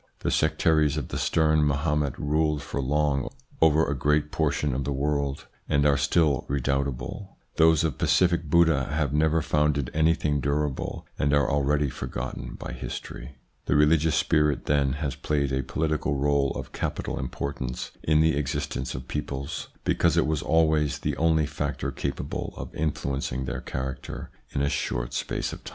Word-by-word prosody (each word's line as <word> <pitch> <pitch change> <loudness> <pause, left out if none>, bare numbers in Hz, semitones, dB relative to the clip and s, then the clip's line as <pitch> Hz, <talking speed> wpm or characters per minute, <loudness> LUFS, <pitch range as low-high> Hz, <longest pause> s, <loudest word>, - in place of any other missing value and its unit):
The - - 0
sectaries 75 -1 +2
of 75 - -3
the - - -3
stern 80 -2 +3
Mahomet 75 -1 0
ruled 75 0 0
for 70 - -3
long 70 0 +1 0.3
over 80 0 +5
a 70 - -1
great 75 +2 +1
portion 75 -2 0
of 65 +2 -1
the 70 - -2
world, 70 0 -1 0.2
and 70 0 +3
are 70 -1 +5
still 75 -1 +2
redoubtable; 70 +6 -2 0.2
those 80 -1 +5
of 80 -5 -2
pacific 85 -2 +3
Buddha 80 -3 +3
have 75 -2 -1
never 80 +1 +2
founded 75 -4 +1
anything 80 -2 +2
durable, 70 -1 -2
and 70 +1 +3
are 70 -2 +3
already 70 +1 +1
forgotten 65 0 -5
by - - -7
history. 65 +4 -7 0.3
The - - +2
religious 75 +1 +4
spirit 75 -3 +2
then 70 -2 +2
has 70 -1 -2
played 70 -2 -1
a 65 - +1
political 75 +1 -1
role 70 0 +2
of - - -6
capital - - -3
importance 65 -1 -4
in 75 0 +3
the 80 -2 +3
existence 75 -3 -2
of 65 0 -7
peoples, 70 +2 -4 0.2
because - - +2
it - - +4
was 75 0 0
always 80 -3 +2
the - - -2
only 80 -1 +3
factor 70 -2 -3
capable 70 +1 -4
of - - -7
influencing 70 -4 -2
their - - -4
character 65 0 -5 0.2
in 70 - -1
a - - +2
short - - -2
space - - -2
of - - -10
time. - - -7
75 Hz, 165 wpm, -26 LUFS, 70-75 Hz, 0.3 s, over